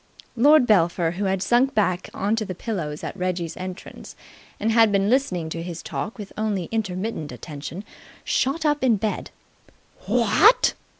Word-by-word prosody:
Lord 285 Hz, +3 st, +6 dB
Belpher, 170 Hz, -5 st, +2 dB
who 200 Hz, -, -1 dB
had 190 Hz, 0 st, 0 dB
sunk 250 Hz, +2 st, +2 dB
back 185 Hz, -4 st, 0 dB
on 205 Hz, +3 st, -1 dB
to 220 Hz, -, 0 dB
the 190 Hz, -3 st, -6 dB
pillows 165 Hz, -8 st, -4 dB
at -, -, -5 dB
Reggie's 180 Hz, -3 st, -3 dB
entrance 185 Hz, +1 st, -8 dB, 0.4 s
and 225 Hz, -, 0 dB
had 225 Hz, -1 st, +5 dB
been 200 Hz, +1 st, +2 dB
listening 200 Hz, -11 st, +1 dB
to 165 Hz, +1 st, -4 dB
his 170 Hz, -1 st, -7 dB
talk 215 Hz, -, -5 dB
with 205 Hz, -3 st, -9 dB
only 205 Hz, -5 st, -2 dB
intermittent 200 Hz, -6 st, -3 dB
attention, 155 Hz, +5 st, -8 dB, 0.4 s
shot 300 Hz, +5 st, 0 dB
up 295 Hz, -2 st, +1 dB
in 245 Hz, -4 st, +4 dB
bed. 210 Hz, +2 st, -3 dB, 0.8 s
"What!" -, -, +4 dB
200 Hz, 160 wpm, -23 LUFS, 180-225 Hz, 0.8 s, Lord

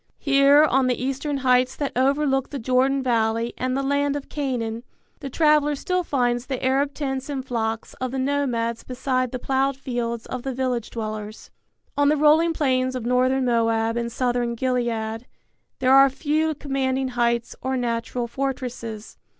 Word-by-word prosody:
Here 280 Hz, +1 st, +5 dB
on 265 Hz, -3 st, +3 dB
the 250 Hz, -, 0 dB
eastern 275 Hz, +3 st, -2 dB
heights 255 Hz, 0 st, +3 dB
that 285 Hz, -2 st, -2 dB
overlook 270 Hz, +1 st, +1 dB
the 285 Hz, -, -5 dB
Jordan 260 Hz, +2 st, +1 dB
valley 230 Hz, -1 st, 0 dB
and 255 Hz, +1 st, -2 dB
the 275 Hz, -, -1 dB
land 285 Hz, +1 st, +1 dB
of 285 Hz, -, -6 dB
Canaan 240 Hz, -6 st, -3 dB, 0.4 s
the 275 Hz, -, -6 dB
traveller 300 Hz, 0 st, +3 dB
still 365 Hz, +6 st, -1 dB
finds 245 Hz, -5 st, 0 dB
the 260 Hz, -1 st, -3 dB
Arab 275 Hz, +2 st, +1 dB
tents 270 Hz, -1 st, -3 dB
and 270 Hz, -2 st, -4 dB
flocks 225 Hz, -3 st, -3 dB
of 255 Hz, -, -1 dB
the 265 Hz, -, -4 dB
nomads 255 Hz, -4 st, -1 dB
beside 255 Hz, -1 st, -1 dB
the 255 Hz, -, -3 dB
plowed 270 Hz, +1 st, 0 dB
fields 240 Hz, -3 st, -3 dB
of 255 Hz, -, -5 dB
the 265 Hz, 0 st, -4 dB
village 250 Hz, -3 st, -2 dB
dwellers. 215 Hz, -1 st, -6 dB, 0.4 s
On 285 Hz, 0 st, +3 dB
the 305 Hz, -, +2 dB
rolling 310 Hz, +3 st, +4 dB
plains 260 Hz, -4 st, 0 dB
of 245 Hz, -3 st, -4 dB
northern 255 Hz, +2 st, +2 dB
Moab 230 Hz, -1 st, +1 dB
and 235 Hz, 0 st, -2 dB
southern 245 Hz, -1 st, -1 dB
Gilead 235 Hz, -2 st, -2 dB, 0.5 s
there 260 Hz, 0 st, +3 dB
are 275 Hz, 0 st, +7 dB
few 310 Hz, +3 st, 0 dB
commanding 265 Hz, -2 st, -1 dB
heights 235 Hz, -1 st, 0 dB
or 260 Hz, 0 st, -1 dB
natural 240 Hz, 0 st, -2 dB
fortresses. 240 Hz, -4 st, -5 dB
255 Hz, 165 wpm, -23 LUFS, 240-275 Hz, 0.5 s, are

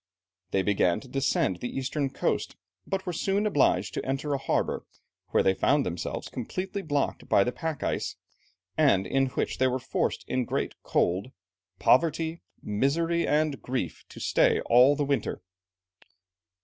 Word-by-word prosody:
They 95 Hz, 0 st, +1 dB
began 95 Hz, -4 st, +2 dB
to 135 Hz, -, -13 dB
descend 135 Hz, -8 st, +1 dB
the 120 Hz, -, -4 dB
eastern 135 Hz, +1 st, -1 dB
coast, -, -, -1 dB, 0.3 s
but 195 Hz, -1 st, -2 dB
were 180 Hz, -, -2 dB
soon 195 Hz, +5 st, 0 dB
obliged 120 Hz, -, +2 dB
to -, -, -3 dB
enter 135 Hz, +2 st, -2 dB
a 140 Hz, -, 0 dB
harbour, -, -, -1 dB, 0.4 s
where -, -, +2 dB
they 95 Hz, -, +4 dB
found 140 Hz, +8 st, +2 dB
themselves 85 Hz, 0 st, -4 dB
completely 185 Hz, -, -4 dB
blocked 145 Hz, -5 st, -1 dB
in -, -, -17 dB
by 100 Hz, -, +5 dB
the 125 Hz, -, -1 dB
pack 160 Hz, 0 st, -4 dB
ice, -, -, -2 dB, 0.6 s
and 95 Hz, 0 st, +4 dB
in 135 Hz, 0 st, +1 dB
which 130 Hz, -, -2 dB
"they 130 Hz, -, +4 dB
were 130 Hz, 0 st, 0 dB
forced 130 Hz, -, -2 dB
in 130 Hz, -1 st, 0 dB
great -, -, -2 dB
cold, 95 Hz, +7 st, 0 dB, 0.5 s
poverty, 160 Hz, +3 st, +2 dB, 0.2 s
misery, 165 Hz, +10 st, +1 dB
and 150 Hz, -1 st, +1 dB
grief, 125 Hz, -11 st, -3 dB
to -, -, -11 dB
stay -, -, +3 dB
all 125 Hz, +4 st, +5 dB
the 145 Hz, 0 st, 0 dB
winter." 135 Hz, -9 st, -1 dB
135 Hz, 160 wpm, -27 LUFS, 120-155 Hz, 0.6 s, by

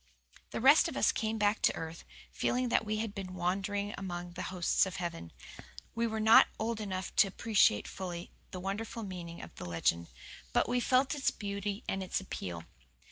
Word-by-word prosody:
The -, -, -4 dB
rest 275 Hz, +6 st, +7 dB
of -, -, -5 dB
us -, -, +4 dB
came 220 Hz, 0 st, -2 dB
back 210 Hz, 0 st, +2 dB
to -, -, +3 dB
earth, 160 Hz, 0 st, -7 dB, 0.3 s
feeling 250 Hz, 0 st, 0 dB
that -, -, +3 dB
we 215 Hz, 0 st, -2 dB
had 215 Hz, -1 st, -3 dB
been 185 Hz, -2 st, -6 dB
wandering 200 Hz, +3 st, -1 dB
among 175 Hz, -2 st, -5 dB
the 175 Hz, +1 st, -6 dB
hosts 185 Hz, +1 st, +2 dB
of 185 Hz, -, -6 dB
heaven. 165 Hz, -, -5 dB, 0.6 s
We 230 Hz, 0 st, 0 dB
were 220 Hz, -1 st, -3 dB
not 220 Hz, +1 st, +7 dB
old 220 Hz, 0 st, -2 dB
enough 190 Hz, -3 st, -4 dB
to 200 Hz, -, +7 dB
appreciate 200 Hz, -, +3 dB
fully 175 Hz, -2 st, -6 dB, 0.2 s
the 185 Hz, -, -6 dB
wonderful 205 Hz, +4 st, -4 dB
meaning 175 Hz, -3 st, -7 dB
of -, -, -11 dB
the -, -, -6 dB
legend; 85 Hz, 0 st, 0 dB, 0.5 s
but -, -, +3 dB
we 245 Hz, +1 st, +1 dB
felt 255 Hz, +2 st, +3 dB
its 285 Hz, -2 st, +1 dB
beauty 200 Hz, +1 st, -4 dB
and 195 Hz, -, -1 dB
its 185 Hz, -, -1 dB
appeal. 90 Hz, -, -6 dB
195 Hz, 190 wpm, -32 LUFS, 175-220 Hz, 0.6 s, rest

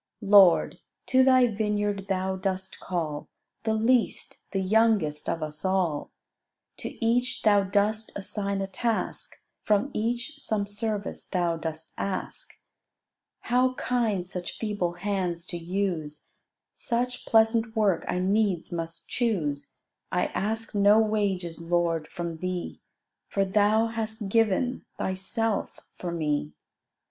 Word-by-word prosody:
Lord, 195 Hz, -3 st, +6 dB, 0.3 s
to 260 Hz, 0 st, +4 dB
Thy 255 Hz, -1 st, +6 dB
vineyard 205 Hz, -3 st, -1 dB
Thou 190 Hz, 0 st, 0 dB
dost 190 Hz, 0 st, -3 dB
call 155 Hz, -5 st, -3 dB, 0.4 s
The 220 Hz, -1 st, +2 dB
least, 230 Hz, +2 st, 0 dB
the 195 Hz, -, 0 dB
youngest 200 Hz, -7 st, +2 dB
of 165 Hz, -, -1 dB
us 155 Hz, 0 st, -5 dB
all: 185 Hz, -6 st, 0 dB, 0.7 s
To -, -, -5 dB, 0.2 s
each 245 Hz, +2 st, +1 dB
Thou 205 Hz, -2 st, +5 dB
dost 210 Hz, +3 st, +1 dB
assign 200 Hz, 0 st, -2 dB
a 195 Hz, -, -2 dB
task, 225 Hz, +3 st, -3 dB, 0.2 s
From 210 Hz, +6 st, +1 dB
each 240 Hz, +7 st, -2 dB
some 215 Hz, -7 st, -1 dB
service 205 Hz, 0 st, -3 dB
Thou 175 Hz, -2 st, 0 dB
dost 160 Hz, 0 st, -6 dB
ask. 195 Hz, -, -4 dB, 0.8 s
How 255 Hz, +1 st, +2 dB
kind 225 Hz, -9 st, 0 dB
such 180 Hz, -1 st, -5 dB
feeble 205 Hz, -6 st, -1 dB
hands 180 Hz, -2 st, -2 dB
to 175 Hz, -, -5 dB
use; 170 Hz, -4 st, -3 dB, 0.4 s
Such 245 Hz, +1 st, -2 dB
pleasant 225 Hz, +1 st, +3 dB
work 205 Hz, -6 st, +2 dB
I -, -, -1 dB
needs 190 Hz, -1 st, +1 dB
must 165 Hz, -1 st, -5 dB
choose: 155 Hz, -, -2 dB, 0.3 s
I 180 Hz, -1 st, +2 dB
ask 225 Hz, +3 st, -2 dB
no 205 Hz, +1 st, +5 dB
wages, 200 Hz, -6 st, 0 dB
Lord, 165 Hz, -2 st, 0 dB
from 170 Hz, -2 st, -5 dB
thee, 185 Hz, +1 st, -4 dB, 0.5 s
For 195 Hz, -1 st, +1 dB
Thou 210 Hz, +3 st, +3 dB
hast 220 Hz, -2 st, -3 dB
given 225 Hz, +4 st, +2 dB
Thyself 195 Hz, +3 st, -2 dB, 0.2 s
for 175 Hz, -, -3 dB
me. 150 Hz, -3 st, -1 dB
200 Hz, 125 wpm, -27 LUFS, 175-220 Hz, 0.8 s, Lord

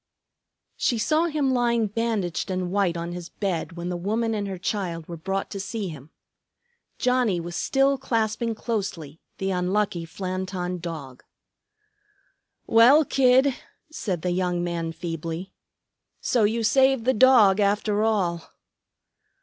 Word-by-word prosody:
She 240 Hz, -, +1 dB
saw 310 Hz, +9 st, +2 dB
him 295 Hz, -5 st, 0 dB
lying 235 Hz, -2 st, +2 dB
bandaged 210 Hz, -6 st, -2 dB
and 185 Hz, -1 st, -2 dB
white 190 Hz, -4 st, +1 dB
on 170 Hz, +1 st, -4 dB
his 175 Hz, -1 st, -7 dB
bed 185 Hz, -3 st, -3 dB
when 170 Hz, +1 st, -5 dB
the 180 Hz, -, -2 dB
woman 220 Hz, +6 st, -1 dB
and 205 Hz, -2 st, -2 dB
her 190 Hz, -1 st, -5 dB
child 175 Hz, -4 st, -3 dB
were 170 Hz, -, -6 dB
brought 195 Hz, +4 st, -3 dB
to 200 Hz, -, -5 dB
see 200 Hz, 0 st, -4 dB
him. 150 Hz, -2 st, -10 dB, 0.9 s
Johnnie 250 Hz, -7 st, +1 dB
was 175 Hz, +1 st, -6 dB
still 270 Hz, 0 st, +2 dB
clasping 225 Hz, -2 st, -1 dB
closely 190 Hz, -, -4 dB, 0.2 s
the 195 Hz, 0 st, -2 dB
unlucky 185 Hz, 0 st, 0 dB
Flanton 185 Hz, 0 st, -4 dB
Dog. 150 Hz, -7 st, -7 dB, 1.4 s
"Well, 250 Hz, +7 st, +6 dB
Kid," 260 Hz, +1 st, +4 dB, 0.4 s
said 190 Hz, -, -3 dB
the 180 Hz, -, 0 dB
young 180 Hz, -1 st, 0 dB
man 170 Hz, -1 st, -2 dB
feebly, 165 Hz, +2 st, -5 dB, 0.7 s
"so 235 Hz, -4 st, +2 dB
you 225 Hz, +2 st, 0 dB
saved 265 Hz, +1 st, +3 dB
the 260 Hz, -, +3 dB
dog, 220 Hz, -5 st, +6 dB
after 205 Hz, +1 st, +1 dB
all." 185 Hz, -7 st, 0 dB
195 Hz, 135 wpm, -25 LUFS, 175-230 Hz, 1.4 s, Well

